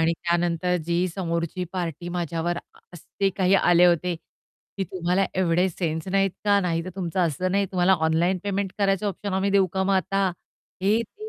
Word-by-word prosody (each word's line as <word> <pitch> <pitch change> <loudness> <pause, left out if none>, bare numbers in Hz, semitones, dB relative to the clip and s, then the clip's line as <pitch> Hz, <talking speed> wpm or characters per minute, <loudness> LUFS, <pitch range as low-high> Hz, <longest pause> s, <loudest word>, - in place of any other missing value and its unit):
आणि 165 +1 +3
त्यानंतर 175 +1 0
जी 170 0 +1 0.2
समोरची 170 0 -2
पार्टी 175 -2 -4
माझ्यावर 170 0 -2 0.4
असे 195 +4 -2
काही 190 0 +3
आले 175 -2 +5
होते, 175 0 +2 0.6
की 195 - -1
"तुम्हाला 185 +2 0
एवढे 180 0 +2
सेन्स 160 -1 -3
नाहीत 195 0 +2
का? 205 -1 +4
नाहीतर 175 -1 -2
तुमचं 180 -1 -2
असं 175 +4 -2
नाही 200 0 +2
तुम्हाला 185 +1 +4
ऑनलाईन 170 +4 +2
पेमेंट 200 -1 -2
करायचं 195 0 +1
ऑप्शन 200 +1 -5
आम्ही 190 +1 +1
देऊ 195 -1 +4
का 190 - 0
मग 195 0 +2
आता?" 195 +2 +1 0.6
हे, 210 +4 +3
ते. 430 - -10
180 Hz, 170 wpm, -24 LUFS, 170-195 Hz, 0.6 s, आले